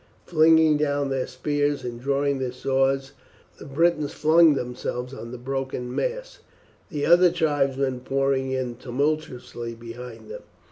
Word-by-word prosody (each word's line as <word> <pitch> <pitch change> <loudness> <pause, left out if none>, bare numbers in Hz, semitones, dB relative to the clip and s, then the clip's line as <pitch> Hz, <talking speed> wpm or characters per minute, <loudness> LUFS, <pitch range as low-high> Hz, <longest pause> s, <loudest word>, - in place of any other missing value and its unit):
Flinging 160 -2 +5
down 145 -2 0
their 130 -1 -1
spears 145 -2 -1
and 120 -1 -6
drawing 140 +1 0
their 130 -2 -2
swords 135 +1 0 0.5
the - - -10
Britons 155 0 +1
flung 160 0 +5
themselves 125 0 -4
on 115 -3 -8
the 125 - -6
broken 130 -1 -4
mass, - - -3 0.5
the 145 -5 -2
other 175 +2 +6
tribesmen 135 -4 0
pouring 135 +1 0
in 130 -2 -3
tumultuously 125 -3 -3
behind 115 -1 -10
them. - - -7
135 Hz, 135 wpm, -24 LUFS, 125-150 Hz, 0.5 s, other